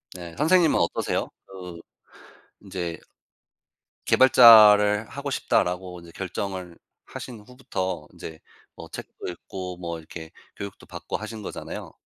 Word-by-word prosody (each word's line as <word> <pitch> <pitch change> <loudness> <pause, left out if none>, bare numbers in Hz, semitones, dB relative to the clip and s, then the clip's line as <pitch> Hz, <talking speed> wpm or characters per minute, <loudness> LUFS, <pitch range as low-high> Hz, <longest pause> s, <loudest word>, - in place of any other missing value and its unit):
네. 85 -2 -9
선생님은 165 +2 +4
어떠세요? - - -1 0.2
그 90 -3 -10 0.8
인제 90 -4 -5 1.1
'개발자를 110 -4 +7
하고 140 0 -5
싶다.'라고 90 -6 -1
이제 85 0 -14
결정을 95 -2 -5 0.3
하신 120 -3 -9
후부터 105 - -5
인제 80 -1 -9 0.4
뭐 - - -10
책도 - - -8
읽고 90 +1 -7
뭐 85 -2 -5
이렇게 80 0 -10 0.2
교육도 100 0 -8
받고 - - -6
하신 110 +1 -8
거잖아요. - - -7
95 Hz, 270 characters per minute, -25 LUFS, 90-110 Hz, 1.1 s, 개발자를